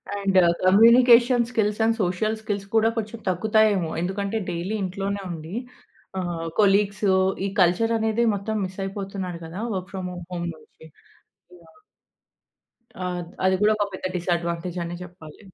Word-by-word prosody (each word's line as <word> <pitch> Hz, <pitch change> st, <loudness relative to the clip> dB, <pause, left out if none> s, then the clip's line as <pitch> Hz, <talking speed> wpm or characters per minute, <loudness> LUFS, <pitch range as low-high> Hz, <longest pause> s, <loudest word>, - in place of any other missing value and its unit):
And 195 Hz, -1 st, 0 dB, 0.3 s
communication 235 Hz, +4 st, +6 dB
skills, 210 Hz, -2 st, 0 dB
and 225 Hz, 0 st, +2 dB
social 195 Hz, +4 st, 0 dB
skills 205 Hz, -2 st, -4 dB
కూడా 220 Hz, 0 st, +4 dB
కొంచెం 220 Hz, +1 st, -4 dB
తగ్గుతాయేమో? 205 Hz, -2 st, +2 dB
ఎందుకంటే 200 Hz, +4 st, -2 dB
డైలీ 175 Hz, +5 st, -3 dB
ఇంట్లోనే 195 Hz, +2 st, -3 dB
ఉండి. 165 Hz, +4 st, -7 dB, 0.6 s
ఆహ్, 170 Hz, -2 st, -3 dB
కొలీగ్సు 200 Hz, -1 st, +3 dB, 0.3 s
ఈ -, -, 0 dB
కల్చర్ 195 Hz, +7 st, +3 dB
అనేది 220 Hz, +1 st, +1 dB
మొత్తం 215 Hz, +2 st, -3 dB
మిస్ 185 Hz, +1 st, -9 dB
అయిపోతున్నారు 195 Hz, -3 st, -5 dB
కదా! 170 Hz, +5 st, -7 dB
వర్క్ 185 Hz, 0 st, -4 dB
ఫ్రమ్ 185 Hz, -1 st, -4 dB, 0.2 s
హోమ్ 175 Hz, -1 st, -3 dB
నుంచి 160 Hz, -, -19 dB, 0.8 s
యాహ్! 165 Hz, -, -22 dB, 1.1 s
ఆ! 185 Hz, -, -5 dB, 0.2 s
ద -, -, -15 dB, 0.2 s
అది 190 Hz, 0 st, +4 dB
కూడా 210 Hz, +1 st, +5 dB
ఒక 205 Hz, -1 st, 0 dB
పెద్ద 185 Hz, -, -6 dB
డిసాడ్వాంటేజ్ 170 Hz, 0 st, -2 dB
అనే 170 Hz, +1 st, -5 dB
చెప్పాలి. 175 Hz, -4 st, -13 dB
195 Hz, 140 wpm, -24 LUFS, 180-215 Hz, 1.1 s, communication